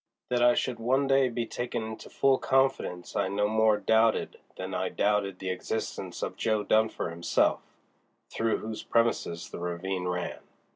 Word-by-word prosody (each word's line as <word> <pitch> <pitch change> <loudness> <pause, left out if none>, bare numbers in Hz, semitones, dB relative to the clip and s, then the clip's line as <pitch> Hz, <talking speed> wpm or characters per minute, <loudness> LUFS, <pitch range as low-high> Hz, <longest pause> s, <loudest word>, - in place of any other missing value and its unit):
That 125 -1 +1
I 120 0 +6
should 125 -2 -1
one 130 +4 +2
day 135 -1 +3
be 120 0 -2
taken 120 0 -3
into 110 0 -7
full 135 -1 +3
confidence 135 -10 0
I - - +1
no 100 +2 +1
more 110 0 +3
doubted 110 +1 +2 0.2
than 95 0 -5
I 95 0 -1
doubted 100 -2 0
the 95 0 -3
existence 110 +4 -4
of - - -4
Jo. 110 -2 +1
Dunfer 110 -5 +1
himself, 85 +1 +1 0.7
through 115 0 0
whose 110 0 -6
premises 115 -7 0
the - - -6
ravine 90 +1 -3
ran. 90 0 -3
110 Hz, 160 wpm, -28 LUFS, 95-120 Hz, 0.7 s, I